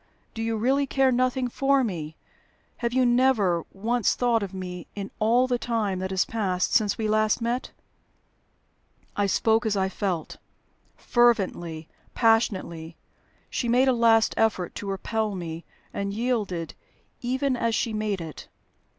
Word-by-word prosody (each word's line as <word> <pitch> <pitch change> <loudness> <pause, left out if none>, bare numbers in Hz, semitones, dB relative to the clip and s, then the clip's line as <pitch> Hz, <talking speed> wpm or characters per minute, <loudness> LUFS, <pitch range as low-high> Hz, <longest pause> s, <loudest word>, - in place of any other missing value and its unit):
Do 225 - -5
you 225 0 -1
really 270 +5 +1
care 270 0 +3
nothing 255 +1 +1
for 275 +2 +2
me? 160 -8 -4 0.6
Have 235 -1 -2
you 255 +1 +3
never 240 -9 +3
once 225 +3 0
thought 240 -2 +2
of 200 -2 -4
me 180 -2 -7
in 200 -1 -5
all 235 +4 +3
the 250 -1 -1
time 215 -6 -1
that 190 0 -3
has 190 -1 +1
passed 190 -5 -1
since 210 -3 +2
we 220 - -1
last 215 +1 +2
met?" 240 +2 -2 1.5
I 205 -1 +1
spoke 220 +3 +2
as 215 -3 0
I 190 0 +1
felt 185 -5 -3 0.6
fervently, 185 -9 +1 0.3
passionately. 185 -8 +1 0.5
She 240 - -1
made 250 +3 +4
a 260 - +4
last 230 -2 +4
effort 215 -5 +1
to 200 - -6
repel 210 +2 -2
me, 165 -2 -6 0.3
and 200 0 -2
yielded 215 -8 -2 0.5
even 260 +2 0
as 230 -2 0
she 225 - -1
made 215 -3 -2
it. 160 -4 -8
220 Hz, 150 wpm, -26 LUFS, 190-240 Hz, 1.5 s, made